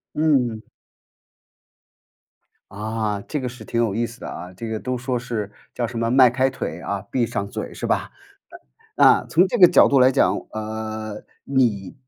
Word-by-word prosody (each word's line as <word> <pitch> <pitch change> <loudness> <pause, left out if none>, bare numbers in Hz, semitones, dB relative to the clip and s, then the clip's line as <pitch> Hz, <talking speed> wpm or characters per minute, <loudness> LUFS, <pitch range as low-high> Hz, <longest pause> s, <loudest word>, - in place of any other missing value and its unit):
嗯。 130 -8 +1 2.1
啊， 105 0 -3
这 150 - -2
个 125 - -3
是 125 +1 -11
挺 115 - -1
有 115 -4 0
意 115 +2 0
思 115 +2 -13
的 - - -7
啊。 90 +2 -8
这 115 +5 -7
个 110 -1 -3
都 125 +2 -3
说 125 0 -2
是 110 -4 -4 0.2
叫 120 - -1
什 115 0 -6
么 115 0 0
“迈 130 -1 +6
开 130 +2 +1
腿 90 -10 -5
啊， 100 +1 -4
闭 120 -3 +1
上 100 -2 -3
嘴” - - -6
是 - - -4
吧？ - - -1 0.9
呃， - - +6
啊， - - +5
从 180 +4 +4
这 240 - -2
个 180 -4 +9
角 - - +6
度 140 -1 +4
来 130 +1 +6
讲， 135 - +2 0.2
呃， 110 0 -5 0.2
你 115 -8 0
115 Hz, 195 characters per minute, -22 LUFS, 110-130 Hz, 2.1 s, 个